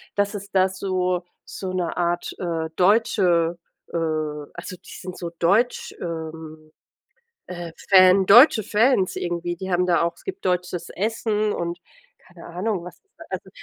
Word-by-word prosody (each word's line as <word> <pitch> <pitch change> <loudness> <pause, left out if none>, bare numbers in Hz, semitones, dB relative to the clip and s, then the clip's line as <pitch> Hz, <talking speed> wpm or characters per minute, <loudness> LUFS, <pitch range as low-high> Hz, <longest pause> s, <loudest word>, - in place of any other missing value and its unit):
dass 205 +1 0
es 200 0 -7
da 190 0 +3
so 185 -2 -1 0.2
so 185 -1 -6
'ne 180 -2 -2
Art, 175 0 -1
äh, 165 -3 -2
deutsche, 180 -4 +3 0.3
äh - - -2 0.6
also 180 +2 -8
die 185 +3 -13
sind 185 -1 -7
so 170 -1 -5
deutsch, 205 +9 +1
ähm, 160 -2 -7 0.8
äh, 175 -2 -7 0.2
Fan, 185 0 +6
deutsche 235 +2 +8
Fans 210 -1 +2
irgendwie. 175 0 -3
Die 190 +2 -6
haben 180 +1 +2
da 175 -2 +3
auch 170 0 0
es - - -20
gibt 190 +1 -7
deutsches 180 -1 -2
Essen 215 +1 -1
und, 170 0 -3 0.4
keine 175 -2 -16
Ahnung, 180 +1 -3
was 180 - -10
es 405 - -38
da, - - -12
also - - -5
180 Hz, 160 wpm, -23 LUFS, 170-200 Hz, 0.8 s, deutsche